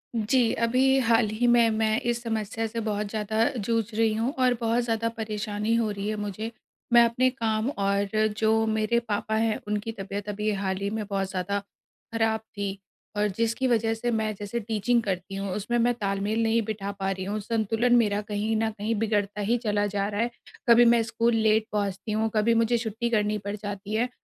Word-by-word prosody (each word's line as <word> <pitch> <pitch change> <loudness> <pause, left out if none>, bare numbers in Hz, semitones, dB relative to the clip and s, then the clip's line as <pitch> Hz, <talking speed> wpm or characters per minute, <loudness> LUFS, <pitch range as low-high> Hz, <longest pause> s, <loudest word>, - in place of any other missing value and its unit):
जी, 230 +2 +2
अभी 255 +4 +3
हाल 230 -2 +3
ही 240 +3 +1
में 235 -1 +5
मैं 220 +1 +1
इस 240 0 -1
समस्या 225 -1 -2
से 230 +1 -4
बहुत 210 0 -1
ज़्यादा 220 +1 0
जूझ 225 +1 0
रही 225 0 +2
हूँ 230 +5 -1
और 255 -1 +4
बहुत 230 +1 +1
ज़्यादा 230 -1 0
परेशानी 215 0 -2
हो 230 -2 +1
रही 200 0 -4
है 215 - -1
मुझे। 210 +2 -4 0.4
मैं 240 0 +8
अपने 240 +2 +2
काम 225 -2 -1
और 200 -1 0
जो 220 0 +3
मेरे 220 +2 +1
पापा 220 -1 -2
हैं 220 0 +1
उनकी 210 +2 -2
तबीयत 200 -1 -6
अभी 210 +1 -1
हाल 190 -1 -2
ही 200 +1 -2
में 215 0 -3
बहुत 195 -1 -1
ज़्यादा 190 +2 -2 0.5
ख़राब 225 -1 +1
थी 200 -2 -5 0.4
और 210 0 +2
जिसकी 230 +3 +1
वजह 225 -2 +2
से 240 +2 -2
मैं 220 -1 0
जैसे 205 +3 -3
टीचिंग 225 +2 +1
करती 190 -1 -3
हूँ 195 0 -3
उसमें 240 +4 -1
मैं 240 +1 +3
तालमेल 205 0 -1
नहीं 225 +1 +2
बिठा 200 -2 -4
पा 195 0 0
रही 190 0 -4
हूँ 205 +2 -2
संतुलन 225 +3 +1
मेरा 210 -3 +2
कहीं 215 +2 0
न 220 0 +1
कहीं 215 +1 -2
बिगड़ता 210 -2 0
ही 225 +4 +1
चला 205 -1 +1
जा 200 0 +1
रहा 205 +1 -1
है। 235 - +1 0.4
कभी 235 +1 +8
मैं 230 - +3
स्कूल 230 +1 +1
लेट 220 0 +3
पहुँचती 200 +1 -2
हूँ 220 +1 +1
कभी 215 +2 +3
मुझे 235 +1 +2
छुट्टी 230 +1 -2
करनी 210 -2 +1
पड़ 205 - -2
जाती 205 0 -6
है। 235 +3 +1
220 Hz, 200 wpm, -26 LUFS, 205-230 Hz, 0.5 s, मैं